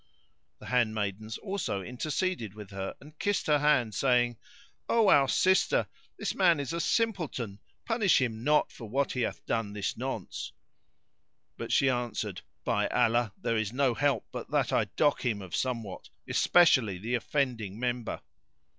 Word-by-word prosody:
The - - -13
handmaidens 110 -3 -1
also 190 - -3
interceded 125 - -2
with 105 -2 -10
her 95 -1 -5
and 150 +2 -16
kissed 205 -1 0
her 150 -1 +3
hand 145 -7 +2
saying, 120 0 +2 0.5
"O 225 -3 +4
our 140 -6 +6
sister, 190 +6 +3 0.3
this - - -2
man 175 -5 +4
is 140 +3 -3
a 170 - -1
simpleton, 165 - -1 0.3
punish 225 -5 +3
him 115 -4 -2
not 150 +2 +3
for 115 -3 -10
what 135 +4 0
he 125 - -2
hath - - -3
done 115 -3 -1
this 100 -2 -2
nonce;" - - -5 1.0
but - - -6
she 135 - +4
answered, 120 -7 -2 0.2
"By - - +1
Allah, 120 -2 +2
there 115 - 0
is 110 0 -2
no 135 -1 +2
help 145 +3 +1
but - - -6
that - - +1
I - - +3
dock 145 -2 +1
him 115 -5 0
of 95 -3 -6
somewhat, 115 -7 -3 0.2
especially 130 - +4
the 110 +7 -4
offending 120 -5 -1
member." 120 -1 -2
125 Hz, 155 wpm, -29 LUFS, 110-150 Hz, 1.0 s, our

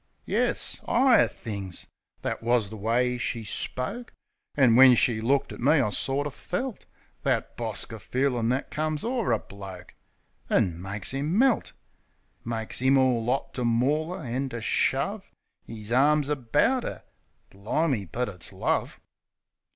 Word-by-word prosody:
Yes, - - 0
'igher 260 -3 +5
things 100 -5 -6 0.2
— - - -44
that - - -2
wus 115 -3 +2
the 110 - -8
way 120 +4 0
she 120 -1 -2
spoke; 130 - -4 0.4
An' 125 -5 +5
when 130 0 +9
she 115 -1 +2
looked 135 +4 +1
at - - -10
me 140 +5 +4
I 130 -9 +2
sorter 140 +6 -1
felt 205 - -5 0.4
That - - -1
bosker - - -4
feelin' 125 -3 0
that 130 +3 -1
comes 155 0 -2
o'er 235 - 0
a 115 - +3
bloke, 95 -4 -11 0.6
An' 85 -2 +1
makes 100 +3 -4
'im 145 +7 -1
melt; 260 0 +2 0.7
Makes 115 0 -3
'im 135 +1 +4
all 125 -3 +2
'ot 135 - -1
to 125 - -2
maul 145 +9 +1
'er, - - -8
an' 130 +2 -2
to 120 -2 -5
shove - - 0 0.4
'Is 110 -1 -8
arms 145 +3 +3
about 150 - +1
'er... - - -6 0.5
Bli'me? 105 - -1
but 125 +1 -1
it's 90 -4 -7
love! - - -1
125 Hz, 150 wpm, -27 LUFS, 115-145 Hz, 0.7 s, when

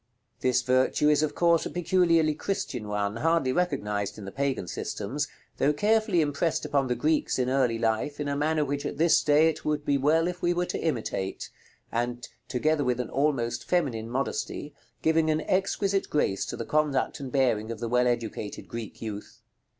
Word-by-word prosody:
This 125 -1 +2
virtue 130 +4 +3
is 150 0 +4
of 155 - -1
course 170 -1 +3
a - - -4
peculiarly 170 -3 +2
Christian 150 - -3
one, 105 +1 -1
hardly 165 -1 +2
recognized 105 - -1
in 105 - -8
the 95 - -6
Pagan 135 -8 -2
systems, 135 +13 -3 0.3
though 145 - +3
carefully 210 +1 +2
impressed 150 +2 0
upon 140 -2 +1
the 125 - 0
Greeks 155 +6 +1
in 130 0 0
early 130 -4 +2
life 115 +6 -1
in 145 - -2
a 140 - -1
manner 150 +1 +1
which 140 0 -2
at - - -4
this 165 +2 +4
day 150 +2 +4
it 155 -1 -2
would 150 -1 -1
be 140 -1 +2
well 160 +5 +3
if 180 0 -4
we 175 0 +1
were 180 0 +1
to - - -4
imitate, 115 -10 -3 0.4
and, 120 +1 -2 0.2
together 150 +4 +1
with 125 -1 0
an 125 - -3
almost 125 -5 0
feminine 125 -11 0
modesty, 135 +3 -3 0.3
giving 160 0 +3
an 155 0 +1
exquisite 195 +2 0
grace 100 -10 0
to - - -5
the - - -4
conduct 150 -3 0
and 135 -2 -6
bearing 120 -5 +1
of 115 -2 -5
the 115 - -3
well 125 +1 +2
educated 115 -3 -3
Greek 115 0 -7
youth. 105 -2 -7
140 Hz, 190 wpm, -27 LUFS, 120-160 Hz, 0.4 s, is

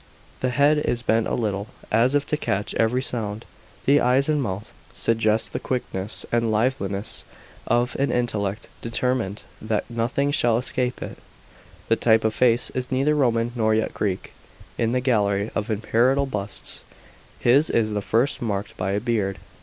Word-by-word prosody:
The 130 - 0
head 145 +4 +4
is 120 -5 -1
bent 110 -1 +2
a - - 0
little, 105 -3 -2 0.2
as 120 +5 +3
if 145 0 +2
to 150 - 0
catch 105 -8 -2
every 120 +3 +1
sound; 110 -3 -2 0.4
the 145 +2 +5
eyes 130 +3 +3
and 150 -2 +2
mouth 105 -3 -4 0.2
suggest 110 -1 +1
the - - -1
quickness 105 -6 -3
and 115 -1 +2
liveliness 105 -3 -1 0.4
of 120 +1 +1
an 140 - +2
intellect 105 -4 -1
determined 115 -3 -1 0.2
that 110 0 -1
nothing 125 +5 0
shall 120 -6 +3
escape 125 0 -1
it. - - -8 0.7
The 115 - +3
type 110 -1 +4
of 110 0 +1
face 120 -1 +3
is 130 0 -4
neither 135 +3 +2
Roman 120 -5 +2
nor 110 -2 +2
yet 110 - 0
Greek. 95 -3 -2 0.4
In 115 0 0
the 125 +1 +1
gallery 105 -4 +1
of 105 +2 -2
imperial 120 +6 +2
busts, 105 -6 -5 0.5
his 135 +6 +4
is 110 -2 +1
the 105 -1 -1
first 120 +7 +1
marked 100 -4 -3
by 95 +1 -1
a 100 - +1
beard. 105 -4 -1
115 Hz, 165 wpm, -24 LUFS, 105-130 Hz, 0.7 s, the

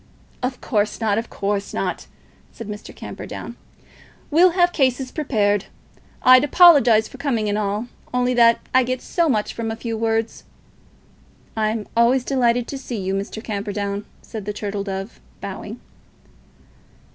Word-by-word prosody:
"Of 250 0 -3
course 210 -3 0
not; 220 -2 +1
of 230 - -6
course 200 0 -2
not," - - -3 0.4
said 230 - -9
Mr. 210 -1 -7
Camperdown. - - -8 0.8
"We'll 345 +3 +5
have 350 0 +4
cases 260 -2 +1
prepared. 205 - 0 0.6
I'd 255 +1 +8
apologise 280 -9 +6
for 265 - -13
coming 240 -7 0
at 205 - 0
all, 210 +1 -1 0.3
only 250 0 +1
that 235 -1 +5
I 260 - +6
get 255 +1 -3
so 340 -2 +1
much 215 -6 0
from 230 -1 -3
a 225 - -3
few 230 0 -4
words." 225 0 -1 1.1
"I'm 215 -1 -1
always 240 +2 +4
delighted 245 -3 +1
to 275 - -5
see 245 -3 -5
you, 190 -1 -2
Mr. 200 +3 -4
Camperdown," 205 -1 -3 0.2
said 220 -4 -7
the 210 - -3
Turtle 205 -1 -4
Dove, 195 +2 -6 0.2
bowing. - - -7
225 Hz, 145 wpm, -21 LUFS, 210-255 Hz, 1.1 s, I'd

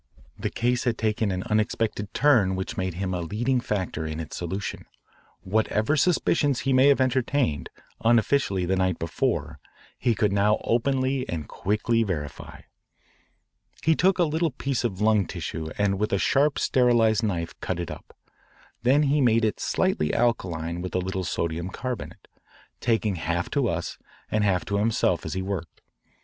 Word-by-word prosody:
The - - -3
case 120 +1 0
had 120 -2 +1
taken 110 -1 0
an 95 -1 -2
unexpected 105 -1 -1
turn 115 -10 +3
which 95 0 -4
made 95 -2 -2
him 95 0 -2
a 90 - -2
leading 120 +9 0
factor 95 -8 -2
in 80 0 -4
its 80 - -6
solution. 95 +3 -4 0.5
Whatever 110 +6 +1
suspicions 150 -4 +2
he 135 - +1
may 130 +2 +6
have 140 -1 +5
entertained 130 - 0 0.3
unofficially 115 -4 +2
the 95 +2 +1
night 95 -2 +1
before 80 - -2 0.4
he 120 -2 +2
could 105 -1 +1
now 105 +2 +3
openly 130 +2 0
and 80 -4 -4
quickly 110 +3 0
verify. 75 -10 -4 1.2
He 160 - +4
took 190 +3 +3
a 180 - +4
little 160 +1 +1
piece 135 -1 -2
of 105 -5 -2
lung 105 -3 +3
tissue 80 0 -5
and 100 -1 +1
with 105 -2 0
sharp 140 +6 +2
sterilised 120 -4 +3
knife 85 -7 -2
cut 90 -2 -3
it 85 - -4
up. - - -11 0.6
Then 135 +5 +4
he 145 +1 +2
made 115 -2 +4
it 110 - -1
slightly 75 - 0
alkaline 85 -8 0
with 90 0 -5
a - - +2
little 95 +1 -3
sodium 85 0 -2
carbonate, 125 +5 -6 0.5
talking 110 -5 0
half 85 +2 -2
to - - +1
us - - -4 0.3
and 110 -1 +2
half 95 -3 +1
to 100 0 -1
himself 110 +1 +1
as - - -4
he 95 - -2
worked. 95 -6 -5
105 Hz, 160 wpm, -25 LUFS, 90-125 Hz, 1.2 s, may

